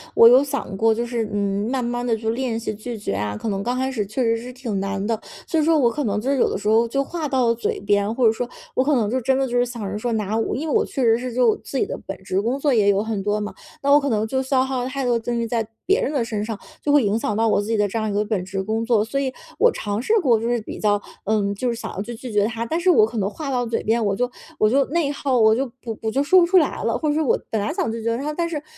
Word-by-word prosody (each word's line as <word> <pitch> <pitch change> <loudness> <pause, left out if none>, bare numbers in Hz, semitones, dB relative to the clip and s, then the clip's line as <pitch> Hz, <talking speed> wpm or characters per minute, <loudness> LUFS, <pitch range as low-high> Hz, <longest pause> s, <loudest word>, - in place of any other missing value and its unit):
我 230 - +9
有 250 +3 +7
想 280 -8 -4
过， 225 +2 +3
就 235 +2 -2
是， 235 -2 -2
嗯， 200 +1 -1
慢 260 -1 -1
慢 240 +1 -2
地 235 -2 +1
就 220 0 -3
练 235 -1 -1
习 220 - -3
拒 225 +3 -6
绝 205 - -3
啊， 105 +1 -2
可 220 - -4
能 195 -1 -2
刚 245 +3 -1
开 260 +1 -1
始 220 -6 -2
确 215 +6 -2
实 230 -1 +2
是 245 +2 -8
挺 240 -6 -3
难 195 0 -2
的， 225 0 -1 0.3
所 325 - +1
以 - - +2
说 320 +1 +4
我 250 -5 +4
可 295 +5 -3
能 210 -3 0
就 255 - -2
是 275 - +1
有 - - +3
的 - - -2
时 210 +1 -2
候 225 +2 +4
就 275 +4 0
话 325 +1 -4
到 260 -3 +1
了 230 - +3
嘴 235 - -2
边， 205 +1 +1
或 255 -1 +2
者 220 - +6
说 240 +2 -3 0.3
我 255 - +3
可 290 +1 +2
能 220 -5 +1
就 255 +4 0
真 265 +2 +2
的 270 - +1
就 245 0 -1
是 245 - +3
想 240 -2 -7
着 205 - -3
说 235 +3 -2
拿 215 0 -1
我 225 - -1
因 305 +5 -3
为 - - 0
我 - - +3
确 270 - -3
实 225 -1 +4
是 250 0 -5
就 240 -2 +3
自 275 - -6
己 - - +2
的 - - -5
本 195 - -5
职 190 0 0
工 240 +6 -1
作 285 -1 +2
也 210 -4 +3
有 200 +1 +2
很 220 -3 -2
多 210 +1 0
嘛， 210 - -4 0.3
那 280 - +2
我 290 - +8
可 280 -1 -2
能 215 -2 +1
就 265 +4 0
消 265 0 +2
耗 260 -1 -2
了 255 - -3
太 275 +1 -3
多 245 -1 +2
的 235 - +1
精 235 +1 -2
力 230 - -1
在 225 -1 -1 0.2
别 390 +4 +3
人 290 - -1
的 270 -5 +1
身 215 -2 -3
上， 220 -2 -4 0.2
就 295 - 0
会 290 -3 +5
影 210 +2 +1
响 210 - -1
到 225 +1 +2
我 - - +3
自 205 - -6
己 225 - 0
的 205 -1 +2
这 225 +3 -3
样 215 0 -1
一 - - -2
个 205 +1 +1
本 210 -4 -2
职 195 0 -3
工 220 +3 -1
作。 225 -3 +3
所 250 +5 -2
以 265 -2 -2 0.3
我 485 - +6
尝 205 - -3
试 345 - 0
过 240 -8 +3
就 230 - -2
是 240 -1 0
比 - - -8
较 205 -1 +2 0.2
嗯， 200 -1 +1
就 225 +5 -3
是 235 - 0
想 230 - -6
要 195 - -4
去 235 +4 -6
拒 240 +1 -8
绝 205 -1 +2
他， 230 +1 -3
但 320 +8 -1
是 360 +2 +2
我 265 -12 +6
可 225 +1 -6
能 200 -2 0
话 290 +6 -6
到 250 -2 0
嘴 230 0 -2
边， 225 +1 +1
我 200 -1 +1
就 245 +3 0 0.3
我 215 - +3
就 270 +4 +3
内 310 -2 0
耗， 275 -3 0
我 220 -1 +5
就 265 +4 0 0.2
不 225 -3 -5
我 220 - -1
就 275 +4 +1
说 370 +6 +6
不 345 - +5
出 365 +2 +4
来 340 - +2
了， - - 0
或 305 - -1
者 295 - +1
说 315 0 +1
我 - - +3
本 220 - -1
来 205 - -2
想 - - -1
拒 230 0 -5
绝 230 +1 0
他， 285 +4 -3
但 335 +2 -1
是 335 -2 -3
可 - - -19
230 Hz, 360 characters per minute, -22 LUFS, 215-265 Hz, 0.3 s, 我